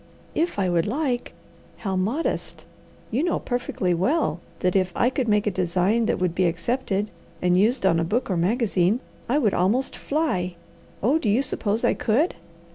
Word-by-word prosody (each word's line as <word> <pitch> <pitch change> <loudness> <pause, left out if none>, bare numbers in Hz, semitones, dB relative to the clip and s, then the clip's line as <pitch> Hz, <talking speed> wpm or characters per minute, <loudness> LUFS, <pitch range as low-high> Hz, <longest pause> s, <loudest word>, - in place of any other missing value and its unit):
"'If 335 -4 0
I 195 -2 +1
would 175 0 +1
like!' 255 0 -1 0.4
How 195 -3 -3
modest! 220 - -2 0.5
You 240 +5 +1
know 345 +1 +1
perfectly 245 -7 -1
well 190 - +1 0.2
that 180 +1 +1
if 185 -1 +2
I 245 - +2
could 260 -2 -1
make 210 -1 +2
a 210 - +1
design 185 +5 +1
that - - +1
would 180 -2 0
be 185 +1 +2
accepted, 205 +3 -1 0.3
and 180 +1 +2
used 215 +4 +2
on 165 -3 +4
a - - +1
book 215 +10 0
or 190 - -1
magazine, 195 +2 +2 0.3
I 265 - +3
would 225 -9 +2
almost 210 +9 +1
fly. 185 - -1 0.5
Oh 275 +9 +3
do 225 - 0
you 235 +7 +3
suppose 220 -4 -1
I - - +4
could?" 270 +11 +1
210 Hz, 180 wpm, -24 LUFS, 180-250 Hz, 0.5 s, on